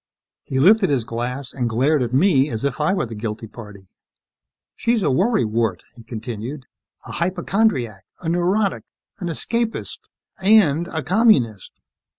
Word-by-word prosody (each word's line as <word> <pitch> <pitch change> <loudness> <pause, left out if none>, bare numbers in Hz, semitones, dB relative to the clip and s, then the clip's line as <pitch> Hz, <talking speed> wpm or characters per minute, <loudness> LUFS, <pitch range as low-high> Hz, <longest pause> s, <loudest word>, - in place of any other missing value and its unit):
He 130 - -4
lifted 195 +6 +5
his 135 -5 +1
glass 125 +3 -4
and 125 -3 -1
glared 135 +6 +2
at 120 -2 -1
me 140 0 +3
as 115 +1 -3
if 140 +1 -2
I 150 - +2
were 195 - 0
the 115 - -8
guilty 110 +1 -5
party. 105 -4 -12 0.8
"She's 230 -3 0
a 150 - +2
worry 190 - +2
wart," 110 -5 -1
he 120 - -14
continued. 115 +4 -6 0.4
"A - - -8
hypochondriac, 175 - 0 0.2
a 170 - -7
neurotic, 185 +4 +1 0.4
an 175 - -4
escapist, 225 +7 -2 0.4
and 185 -6 +4
a 160 -4 -4
communist." 160 - +2
140 Hz, 150 wpm, -21 LUFS, 115-185 Hz, 0.8 s, lifted